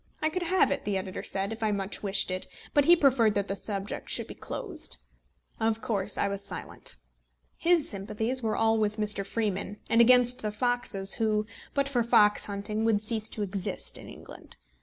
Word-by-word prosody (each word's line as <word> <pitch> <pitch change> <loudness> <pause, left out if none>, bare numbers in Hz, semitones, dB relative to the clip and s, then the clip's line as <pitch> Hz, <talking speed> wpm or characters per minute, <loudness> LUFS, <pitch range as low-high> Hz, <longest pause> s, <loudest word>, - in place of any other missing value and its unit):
I 310 - +1
could 365 +3 -3
have 360 -1 +3
it, 280 - -1
the 200 -1 -1
editor 185 0 -5
said, 195 +3 -2
if 225 - -10
I 220 - +1
much 200 -1 -3
wished 195 -2 +1
it; 185 0 -3 0.3
but 290 -1 +4
he 345 - +8
preferred 255 -9 +3
that 200 -1 0
the 195 - -2
subject 200 -1 -5
should - - +1
be - - -9
closed. 375 -10 -6 0.6
Of 225 0 +1
course 200 -2 0
I - - +1
was 200 0 -4
silent. 200 - -6 0.6
His 340 -3 +3
sympathies 220 +5 -1
were 220 -2 0
all 225 0 +3
with 210 0 0
Mr. 210 -2 0
Freeman, 205 -1 -2
and 230 - +6
against 245 +1 +5
the 210 - -2
foxes, 210 -4 +1
who, 215 -1 +1 0.3
but 280 -1 +2
for 260 -3 +1
fox 210 -3 +4
hunting, 205 +2 -3
would 225 -2 +3
cease 220 +1 0
to 210 - -4
exist 195 -1 -2
in - - -5
England. - - -13
215 Hz, 195 wpm, -28 LUFS, 200-245 Hz, 0.6 s, he